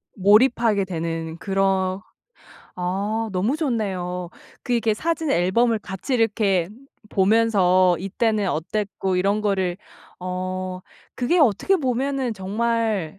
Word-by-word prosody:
몰입하게 210 0 +4
되는 165 -2 -4
그런 195 0 0 0.8
아 200 +5 -2
너무 210 +11 0
좋네요. 185 - -2 0.3
그 245 - -3
이렇게 230 -2 +2
사진 320 +3 -2
앨범을 220 +6 +2
같이 205 +6 -4
이렇게 205 -6 +1 0.4
보면서 190 -3 +3
이때는 205 +2 0
어땠고 190 +2 -2
이런 200 +3 +1
거를 190 -4 0 0.4
어 185 0 -4 0.3
그게 300 +9 +1
어떻게 300 - +3
보면은 265 -2 -1
정말 210 -3 -1
200 Hz, 235 characters per minute, -23 LUFS, 185-230 Hz, 0.8 s, 몰입하게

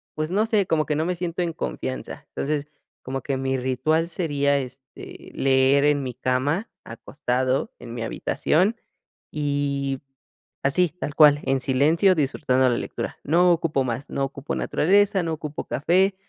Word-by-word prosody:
pues, 155 +2 -3
no 210 +4 +2
sé, 215 -3 +2
como 155 -3 +1
que 150 - -1
no 155 +2 0
me 180 +1 -1
siento 175 0 -3
en 170 -2 -1
confianza, 130 -4 -5
entonces, 145 0 -2 0.4
como 135 +1 -4
que 135 +1 -2
mi 135 0 -1
ritual 130 +6 0
sería, 145 -5 +1
este, 130 0 -9
leer 135 +1 +3
en 145 -1 +2
mi 125 -1 -4
cama, 130 - -1
acostado, 130 +2 -2
en 115 - -9
mi 120 - -5
habitación 180 - +1 0.6
y 140 -2 -1 0.6
así, 175 +6 +3
tal 145 - -4
cual, 145 -1 +7
en 135 0 +1
silencio, 150 +9 +3
disfrutando 130 -4 +1
la 120 - +1
lectura, - - -5
no 175 +4 +4
ocupo 160 -4 +1
más. 125 +2 -4
No 140 - -2
ocupo 140 +1 -5
naturaleza, 195 +3 +2
no 165 - -2
ocupo 150 -1 -6
café, 185 +7 +2
145 Hz, 160 wpm, -24 LUFS, 130-165 Hz, 0.6 s, cual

